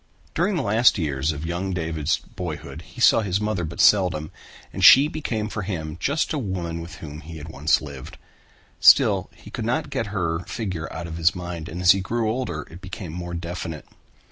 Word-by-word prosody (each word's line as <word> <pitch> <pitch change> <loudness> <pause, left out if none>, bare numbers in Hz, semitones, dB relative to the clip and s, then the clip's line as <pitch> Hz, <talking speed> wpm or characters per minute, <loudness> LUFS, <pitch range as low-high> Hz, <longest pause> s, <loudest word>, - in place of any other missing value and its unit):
During 185 +4 +1
the 160 - 0
last 115 +2 +4
years 75 -3 -1
of 75 +1 -6
young 90 +3 -2
David's 80 -3 -1
boyhood 85 -4 -7
he - - -15
saw - - +6
his 100 -2 -1
mother 105 -4 -1
but 85 +1 -6
seldom 90 -7 +3 0.4
and - - -4
she 140 +3 +9
became 120 -9 -3
for 105 -1 -4
him 80 -6 -4
just 145 - 0
a 150 - -1
woman 90 -7 -3
with 85 +2 -9
whom 75 -2 -9
he 80 +1 -9
had 75 +1 -9
once 80 +3 +1
lived. 70 -3 -9 0.6
Still - - +6
he - - -14
could - - -4
not - - -1
get 115 - -2
her 85 -5 -1
figure 90 -8 -4
out 85 - -6
of 80 -1 -6
his 80 -1 +3
mind 85 -2 -6
and 85 - -6
as 90 - +8
he 95 - +2
grew 110 +3 -1
older 110 - -3
it 90 +3 -11
became 90 -2 -7
more 85 0 -5
definite. 85 -1 -5
85 Hz, 200 wpm, -24 LUFS, 80-105 Hz, 0.6 s, she